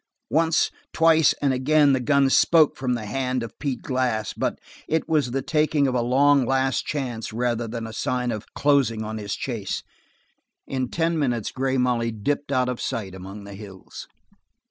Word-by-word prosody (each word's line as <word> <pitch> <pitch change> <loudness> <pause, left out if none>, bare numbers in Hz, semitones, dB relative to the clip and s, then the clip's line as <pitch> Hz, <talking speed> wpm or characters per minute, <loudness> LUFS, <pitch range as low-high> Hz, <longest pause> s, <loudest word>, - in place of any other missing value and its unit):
Once, 165 +1 +2 0.2
twice 160 -1 +5
and 140 -2 +3
again 145 +2 +4
the 130 - +2
gun 140 +2 +3
spoke 155 +3 +4
from 125 -2 -1
the 115 -3 -5
hand 130 +2 -2
of 115 - -9
Pete 135 -5 -3
Glass, 125 -5 -1
but - - -2 0.3
it 160 0 0
was 150 -5 +1
the 135 +2 -2
taking 150 -1 +2
of 130 - -1
a 125 - +1
long 135 +3 +4
last 135 +1 0
chance 125 -7 -3
rather 120 0 -1
than 115 0 -5
a 110 - -7
sign 125 +2 -1
of 110 -1 -6
closing 135 -6 +2
on 110 0 -5
his 100 -1 -4
chase. 115 -7 -4 0.8
In 130 -2 -3
ten 165 0 0
minutes 120 -7 -1
Grey 135 0 -1
Molly 125 -2 +1
dipped 140 +6 -2
out 130 -2 +2
of 125 -1 -3
sight 100 -5 -3
among 95 +2 -9
the 100 0 -10
hills. 95 -2 -10
125 Hz, 180 wpm, -24 LUFS, 115-140 Hz, 0.8 s, twice